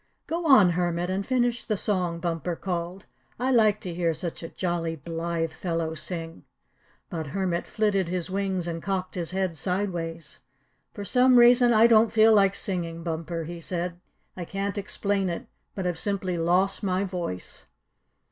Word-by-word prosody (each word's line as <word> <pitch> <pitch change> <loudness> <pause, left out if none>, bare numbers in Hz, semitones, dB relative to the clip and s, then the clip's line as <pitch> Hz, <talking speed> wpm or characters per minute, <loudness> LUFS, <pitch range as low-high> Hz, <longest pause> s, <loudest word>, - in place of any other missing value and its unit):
"Go, 335 0 -2
on, 210 -11 +7
Hermit, 175 +1 -1
and 195 +1 -1
finish 245 0 0
the 215 -3 -1
song," 180 -4 -1
Bumper 170 0 -2
called. 180 +1 -4 0.3
"I 255 +2 +1
like 215 -4 +4
to 180 - -5
hear 170 -1 0
such 165 +2 -5
a 165 - -6
jolly, 170 -2 -2
blithe 165 +1 -3
fellow 165 -1 -2
sing." 165 0 -5 0.7
But 160 -4 -4
Hermit 180 +1 -2
flitted 200 -5 0
his 180 -1 -2
wings 190 -2 -1
and 165 -1 -4
cocked 190 -1 -2
his 170 -3 -2
head 185 -2 -1
sideways. 170 -3 -3 0.5
"For 205 - -7
some 250 +3 +5
reason 240 0 +7
I 220 0 +6
don't 225 -1 +5
feel 220 0 +6
like 200 -2 +4
singing, 170 -4 -3
Bumper," 165 0 -3
he 170 +1 -7
said. 175 0 -3 0.4
"I 180 - -5
can't 195 +3 -3
explain 200 -1 -1
it, 170 - -4 0.3
but 190 - -3
I've 175 -2 -1
simply 195 -3 -1
lost 180 +4 +1
my 190 -1 0
voice." 175 - -5
180 Hz, 165 wpm, -26 LUFS, 170-200 Hz, 0.7 s, on